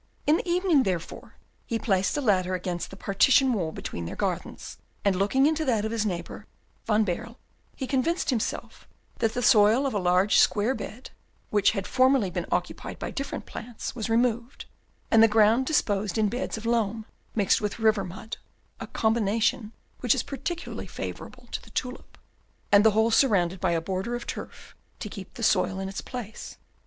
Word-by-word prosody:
In 305 +2 +4
the 355 - -5
evening, 350 -4 +3
therefore, 180 -8 -4 0.3
he 230 - -1
placed 195 +1 0
a - - 0
ladder 185 -6 +2
against 180 -1 -4
the - - -10
partition 250 +7 +3
wall 175 -7 -1
between 85 - -6
their - - -6
gardens, - - -4 0.3
and, 200 -2 +3
looking 205 +9 +2
into 315 +1 +2
that 225 -7 +1
of 220 - -2
his 220 -2 0
neighbour 175 +3 -5 0.4
Van 215 0 +3
Baerle, 230 +6 -4 0.4
he 265 - -4
convinced 275 +5 0
himself 230 -4 -4 0.3
that 225 0 0
the 245 - -1
soil 220 +5 +5
of 270 - -1
a 205 - 0
large 180 +2 +3
square 210 +5 +3
bed, 255 -1 -8 0.4
which 205 -1 +3
had 195 -3 -3
formerly 255 -6 +3
been - - -3
occupied - - -3
by - - -5
different 275 0 -5
plants, 235 +1 -7
was 225 -2 -3
removed, 235 +2 0 0.5
and 225 - +6
the 225 - +8
ground 220 +4 +4
disposed 205 - 0
in 215 -1 +2
beds 245 +1 -3
of 220 - -8
loam 225 -2 0 0.3
mixed 205 -4 +2
with 210 -1 -2
river 220 -3 +2
mud 185 +5 -7 0.4
(a - - -6
combination 220 0 0 0.3
which 245 -3 +3
is - - -1
particularly 330 +5 -5
favourable - - -8
to - - -3
the - - -16
tulip), 250 0 -5 0.5
and 205 0 +7
the 220 - +7
whole 220 +1 +3
surrounded 190 -8 +3
by 175 -2 +1
a 165 - +1
border 190 +7 -3
of 240 - -6
turf - - -8 0.2
to - - -5
keep 195 -1 -10
the 230 - -6
soil 190 -3 +2
in 190 - -3
its 195 0 -5
place. 230 -4 -8
220 Hz, 185 wpm, -26 LUFS, 195-245 Hz, 0.5 s, the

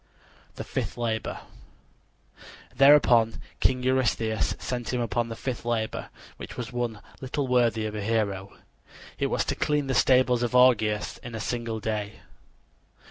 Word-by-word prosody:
THE - - -5
FIFTH - - -4
LABOR 115 -2 -2 1.3
Thereupon 125 -5 +5 0.2
King 130 -1 +1
Eurystheus 120 -4 +1
sent 120 -2 -4
him 125 - -1
upon 120 0 -1
the 115 - -5
fifth 125 +1 -4
labor, 115 -2 -2 0.3
which - - -9
was 125 0 -5
one 120 -3 -3 0.2
little 135 +2 -2
worthy 120 -3 +2
of 105 - -4
a 105 - -4
hero. 100 -3 -1 0.7
It - - +1
was - - 0
to - - -1
clean 150 -1 0
the 135 - -1
stables 125 -1 +4
of 120 +1 -1
Augeas 110 -5 +3
in 120 -1 -8
a - - -4
single 115 0 -3
day. 105 -1 -3
120 Hz, 145 wpm, -26 LUFS, 110-125 Hz, 1.3 s, Thereupon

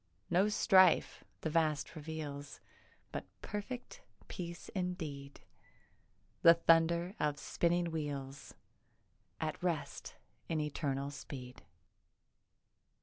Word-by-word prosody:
No 190 +4 +4
strife 190 -4 +5 0.2
the 160 - -2
vast 155 -1 +1
reveals 150 -2 -6 0.5
But - - -5 0.2
perfect 245 - -5 0.3
peace 170 -1 -6
indeed— 160 -7 -4 1.0
The 165 0 +9
thunder 170 +2 +4
of 150 -1 +1
spinning 170 +2 +1
wheels 140 -3 -5 0.8
At 155 -2 -3
rest 170 -4 -2 0.3
in 160 - 0
eternal 140 -2 -2
speed. 125 -3 -8
160 Hz, 90 wpm, -35 LUFS, 145-175 Hz, 1.0 s, The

